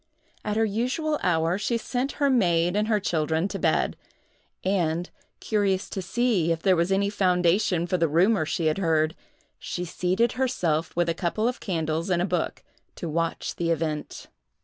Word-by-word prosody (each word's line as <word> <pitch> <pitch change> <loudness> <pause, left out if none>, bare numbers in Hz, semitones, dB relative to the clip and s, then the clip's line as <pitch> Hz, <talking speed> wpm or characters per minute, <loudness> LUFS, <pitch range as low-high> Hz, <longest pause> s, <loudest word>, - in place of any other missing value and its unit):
At 210 0 -2
her 225 - +3
usual 255 +9 -1
hour, 165 +1 +1
she 235 +2 0
sent 250 +4 -2
her 285 - +1
maid 175 -6 +2
and 210 +1 +1
her 215 -2 +2
children 160 -1 0
to - - -4
bed, - - +1 0.7
and, 175 -3 0 0.3
curious 200 -3 0
to 190 - -3
see 195 -3 +1
if 165 -1 -2
there 190 -1 +4
was 170 +2 +1
any 200 +1 +2
foundation 180 -2 +2
for 180 +1 0
the 165 - +3
rumor 180 +5 +3
she 165 +1 -1
had 155 +4 +1
heard, 160 -2 +1 0.4
she 180 - -4
seated 185 +7 +1
herself, 175 -12 -1
with 175 0 +1
a 170 - +1
couple 185 +7 -1
of 250 - -2
candles 165 -2 -2
and 175 -2 +2
a 175 - +1
book, 180 -4 -2 0.3
to 170 - -5
watch 165 +1 -2
the 170 -1 -1
event. 155 -2 -2
180 Hz, 175 wpm, -26 LUFS, 165-210 Hz, 0.7 s, there